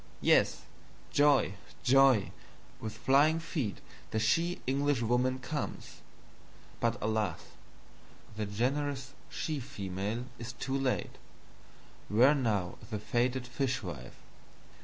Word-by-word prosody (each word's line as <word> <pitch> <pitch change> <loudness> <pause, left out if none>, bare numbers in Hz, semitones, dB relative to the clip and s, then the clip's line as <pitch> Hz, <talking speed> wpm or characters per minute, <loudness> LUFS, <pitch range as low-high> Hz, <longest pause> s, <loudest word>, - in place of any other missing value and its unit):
Yes! - - +3 0.5
Joy, 145 -8 +4 0.3
joy, 135 -5 +5 0.5
with 110 -1 -6
flying 140 +7 +4
Feet 150 - -3 0.3
the 110 - -2
she 165 +11 +2
Englishwoman 130 -2 +1
comes! 145 +4 -5 0.8
But 115 0 +1
alas, 110 -5 -1 0.9
the 105 -1 -2
generous 130 +4 -1 0.2
she 155 -3 -3
Female 100 0 -4
is 120 +1 -6
too 130 +2 -3
late: 135 -2 -1 0.9
where 125 +7 +6
now 105 -10 -1
is - - -13
the 110 - -2
fated 120 +4 0
Fishwife? 120 - -3
125 Hz, 100 wpm, -31 LUFS, 110-135 Hz, 0.9 s, where